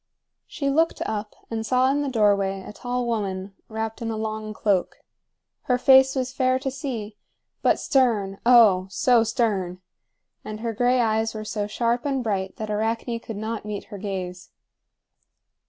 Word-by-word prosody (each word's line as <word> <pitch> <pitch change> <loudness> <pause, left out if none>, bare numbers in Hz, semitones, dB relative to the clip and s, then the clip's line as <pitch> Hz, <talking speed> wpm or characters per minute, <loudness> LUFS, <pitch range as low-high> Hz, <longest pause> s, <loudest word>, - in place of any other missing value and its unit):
She 285 -4 -3
looked 325 +4 +2
up 210 0 -4 0.2
and 225 -1 -2
saw 255 +3 +3
in 290 +1 0
the 285 - -1
doorway 200 -4 +2
a - - -9
tall 245 +2 -3
woman 195 -4 -3 0.2
wrapped 220 0 -4
in 230 - -2
a 220 - -3
long 215 0 -4
cloak. 200 -3 0 0.7
Her 250 - +2
face 265 +1 +6
was 260 -1 -2
fair 255 -1 +2
to 270 0 -3
see, 235 -7 -5 0.4
but - - +3
stern, 220 - +1
oh, 220 -7 +6
so 235 +3 +3
stern! 210 -6 -1 0.6
and 215 0 -7
her 230 -1 -2
gray 245 +3 +2
eyes 220 -1 +1
were 215 0 -5
so 210 -1 -2
sharp 235 +3 0
and 270 -3 -1
bright 195 -4 -2
that 215 -1 -5
Arachne 225 +2 -1
could 225 -2 -7
not 220 +1 -4
meet 210 -1 -5
her 200 - -6
gaze. 185 -2 -5
225 Hz, 165 wpm, -24 LUFS, 205-250 Hz, 0.7 s, face